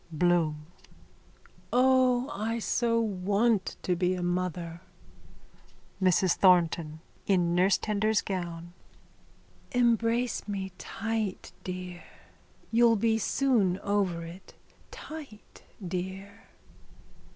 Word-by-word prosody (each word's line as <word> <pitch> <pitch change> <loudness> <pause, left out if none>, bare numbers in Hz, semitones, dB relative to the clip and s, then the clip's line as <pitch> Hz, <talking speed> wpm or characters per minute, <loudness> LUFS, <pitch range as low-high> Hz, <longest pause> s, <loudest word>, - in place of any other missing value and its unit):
_ - - -7
BLOOM: 160 -3 +1 1.1
O, 255 0 +3
I 225 -3 -2
so 230 0 +1
want 205 0 +1
to 180 - +1
be 180 +1 +1
a 180 - -4
mother. 175 -1 -2 1.2
MRS 185 0 +3
THORNTON: 170 -4 +3 0.3
(In 175 -3 +2
nursetender's 205 +4 +2
gown.) 175 -3 -5 1.0
Embrace 235 0 +1
me 195 -2 -4
tight, 225 -3 -3
dear. 180 -1 -6 0.7
You'll 230 0 +5
be 225 +1 +1
soon 220 -8 +2
over 195 -4 0
it. 175 +3 -12 0.3
Tight, 295 -9 -11 0.3
dear. 190 +3 -6
195 Hz, 90 wpm, -28 LUFS, 180-225 Hz, 1.2 s, You'll